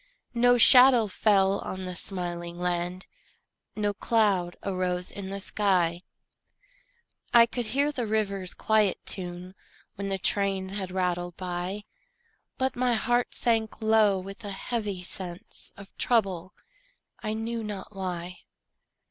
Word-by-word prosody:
No 245 +1 +4
shadow 250 0 +9
fell 200 -1 +2
on 185 0 -6
the 180 - -4
smiling 175 -2 -3
land, 180 +1 -2 0.7
No 205 -1 -1
cloud 200 -5 0
arose 180 -1 -2
in 195 -2 -7
the 200 0 -4
sky; 185 -4 0 1.3
I 235 -1 +9
could 235 0 -4
hear 280 +6 +1
the 245 -6 -3
river's 200 -4 -2
quiet 215 -3 +2
tune 180 0 -5 0.4
When 200 0 -4
the 195 - -1
trains 195 0 -1
had 190 -2 -4
rattled 175 -1 -2
by; 180 +2 -4 0.7
But 260 0 -1
my 250 -1 +1
heart 240 +2 0
sank 225 -3 0
low 220 -3 +3
with 195 +4 -9
a 205 - -5
heavy 200 -2 -4
sense 180 +3 -4
Of 200 -1 -14
trouble, 190 -6 0 0.7
I 215 - -3
knew 225 +1 -4
not 205 -1 -7
why. 180 -2 -5
195 Hz, 130 wpm, -27 LUFS, 180-220 Hz, 1.3 s, shadow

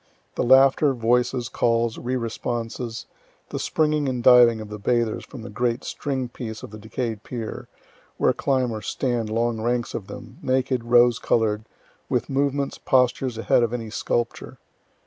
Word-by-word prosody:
The - - -2
laughter, 135 +2 +5
voices, 120 +1 +1
calls, 115 -1 0
re 125 +1 -2
responses 115 0 -4 0.4
the - - -4
springing 150 -2 +1
and 125 -2 -3
diving 120 -2 +7
of 110 -1 -8
the 105 0 -7
bathers 115 +1 0
from 125 -5 -10
the - - -7
great 120 +3 -1
string 135 -3 -3
piece 115 -3 -7
of - - -8
the 110 - -9
decay'd 110 0 -4
pier, 115 -2 -6 0.5
where - - +3
climb 130 -3 0
or 110 -1 -5
stand 120 -2 -2
long 115 0 0
ranks 120 +1 -1
of 100 - -5
them, 125 -2 -10
naked, 130 -1 0
rose 120 0 +5
color'd, 110 -1 +1 0.4
with - - -1
movements, 140 0 0
postures 125 -1 +1
ahead 115 - +3
of 120 0 0
any 115 -3 -4
sculpture. 120 +1 -2
120 Hz, 160 wpm, -24 LUFS, 115-130 Hz, 0.5 s, diving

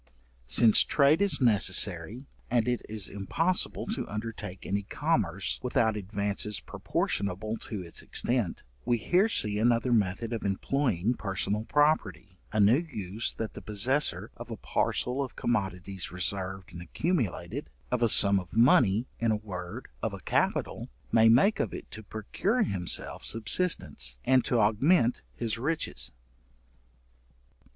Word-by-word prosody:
Since 110 - +6
trade 150 +5 +3
is 200 -2 +1
necessary, 120 +1 +1 0.2
and 120 0 +1
it 125 -1 0
is 105 -2 -1
impossible 165 - 0
to 220 +2 -4
undertake 105 -3 -6
any 100 +1 -1
commerce 100 - -1
without 120 -3 +1
advances 100 +1 -3
proportionable 100 +3 -2
to 105 -4 -6
its 85 - -4
extent; 120 -8 -1 0.2
we 120 0 +1
here 180 - +2
see 105 - +2
another 120 +2 +2
method 110 +2 0
of 115 - -3
employing 105 0 0
personal 100 0 -2
property, 105 - 0
a 110 - -1
new 105 +7 +5
use 110 - -4
that 110 - -5
the - - -9
possessor 125 +8 +1
of - - -9
a - - -6
parcel 125 +3 -1
of 130 - -8
commodities 95 -4 -3
reserved 95 +1 -4
and 85 - -8
accumulated, 95 - -3 0.2
of - - 0
a 115 - +4
sum 100 -1 +6
of 90 - -10
money, 115 -2 +4
in 115 - +1
a 110 - +2
word, 90 -4 -7
of - - -2
a - - -10
capital, - - -1 0.2
may 115 0 +5
make 130 - +4
of - - -2
it - - -10
to 110 - -8
procure 145 - -1
himself 95 - 0
subsistence, 115 - +1
and 130 -2 +4
to 120 - +1
augment, 120 - +3
his 115 -1 -2
riches. 160 +6 -2
110 Hz, 140 wpm, -28 LUFS, 100-125 Hz, 0.2 s, Since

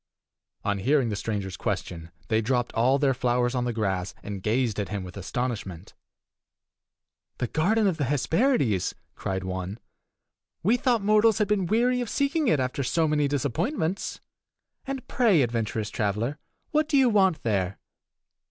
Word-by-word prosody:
On 100 -1 0
hearing 135 +3 +2
the 105 - -2
stranger's 100 -3 -3
question, 85 -1 -4 0.2
they 110 0 +2
dropped 120 +1 0
all 125 +4 +3
their 140 -1 +2
flowers 125 -1 +1
on 125 -1 0
the 120 - 0
grass, 100 -5 -2
and 100 -2 -5
gazed 110 +1 0
at 100 - -2
him 100 -3 -3
with 90 -1 -9
astonishment. 100 -4 -4 1.4
"The 125 - -1
garden 210 - +2
of 185 -5 +1
the 145 - 0
Hesperides!" 145 - +1 0.2
cried 95 -1 -3
one. 95 +2 -4 0.9
"We 215 +7 +4
thought 245 -3 +1
mortals 215 +1 +4
had 210 -1 +1
been 200 -4 +1
weary 245 +4 +2
of 240 - -3
seeking 280 +4 +1
it 155 - +3
after 130 +2 -1
so 160 +5 +1
many 150 -1 +2
disappointments. 160 - -2 0.7
And 270 -1 -4
pray, 210 - +4
adventurous 115 -2 -2
traveler, 115 +6 -1 0.3
what 310 0 +1
do 285 - +3
you 265 -2 +5
want 190 -7 +3
there?" 95 -4 0
130 Hz, 155 wpm, -26 LUFS, -, 1.4 s, you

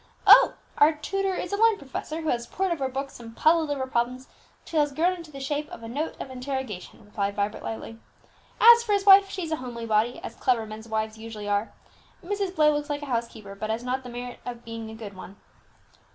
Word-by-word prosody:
"Oh, - - +8 0.2
our 300 +2 +7
tutor 385 +5 -2
is 360 - -4
a - - +1
learned 450 0 +4
professor, 305 +3 -5
who 315 - -2
has 235 -1 -1
pored 380 -1 -1
over 280 -6 -1
books, 270 0 -5
and 230 -1 -11
puzzled 320 -1 +4
over 275 -2 -1
problems, 255 +1 -2 0.4
till 320 - -1
he - - +6
has 290 -1 0
grown 345 +5 +2
into 335 -3 -11
the 275 -2 -9
shape 290 +2 -3
of - - -10
a - - -6
note 290 +8 -4
of 265 - -6
interrogation," 255 -9 -5
replied 200 -1 -2
Vibert 205 0 -2
lightly. 225 0 -6 0.6
"As 470 +1 +9
for 450 -3 -1
his 400 -1 +1
wife, 390 0 +8
she's 345 -5 -4
a 315 - 0
homely 240 -3 -6
body, 220 +2 +1
as - - -6
clever 235 -3 +1
men's 215 +1 -9
wives 220 0 -2
usually 220 -2 -7
are; 205 +2 0 0.5
Mrs. 395 -1 -2
Blair 305 -2 +5
looks 295 0 -2
like 290 0 -3
a 275 -3 -3
housekeeper, 225 -4 -4
but 215 +2 -5
has 225 +2 -2
not 255 +1 -1
the 250 - -9
merit 245 0 -7
of 240 -1 -7
being 230 -1 -6
a 220 - -9
good 215 -3 -8
one." 185 +1 -10
260 Hz, 225 wpm, -26 LUFS, 225-315 Hz, 0.6 s, As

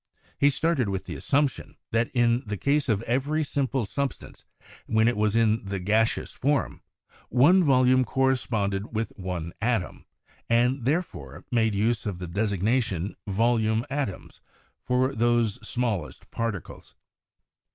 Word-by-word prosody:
He 140 - +5
started 145 -5 +1
with 95 -1 -3
the - - -6
assumption 140 -2 -1
that 115 +1 +1
in 120 0 +2
the 105 -4 -4
case 140 +4 +1
of 110 -1 +1
every 140 +7 0
simple 135 -4 -1
substance, 140 +6 -5 0.4
when 110 +1 +3
it 120 - +2
was 105 0 +1
in 115 -1 +2
the 100 0 -4
gaseous 110 +5 +1
form, 145 +1 -1 0.5
one 160 - +5
volume 130 -3 +4
corresponded 115 -6 -1
with 110 +1 -1
one 90 -3 -5
atom, 110 -5 -1 0.4
and, 120 +2 +2
there 160 +7 +2
fore, - - -11
made 110 -3 +2
use 110 +2 0
of 100 -4 -3
the 90 - -6
designation 100 0 -1
"volume 110 +2 +1
atoms" 135 -10 -4 0.4
for 130 +2 +1
those 120 -2 +1
smallest 110 -7 -3
particles. 115 -7 -5
115 Hz, 135 wpm, -26 LUFS, 105-130 Hz, 0.5 s, He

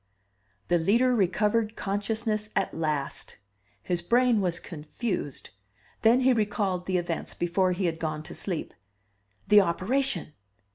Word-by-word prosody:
THE 175 - +3
LEADER 235 +9 +3
RECOVERED 210 +2 +1
CONSCIOUSNESS 215 +2 -2
AT 195 - 0
LAST. 155 -4 -3 0.5
His 175 +6 -1
brain 235 +3 +3
was 175 -3 0
confused 155 - -5 0.5
then 235 +3 +5
he 260 0 +5
recalled 200 -5 -1
the 185 -1 +1
events 175 -1 -3
before 180 +2 +1
he 185 +1 -2
had 165 -1 -1
gone 155 -1 -3
to - - -8
sleep. 180 -5 -4 0.7
The 210 0 +7
operation! 195 - -1
195 Hz, 130 wpm, -27 LUFS, 170-220 Hz, 0.7 s, The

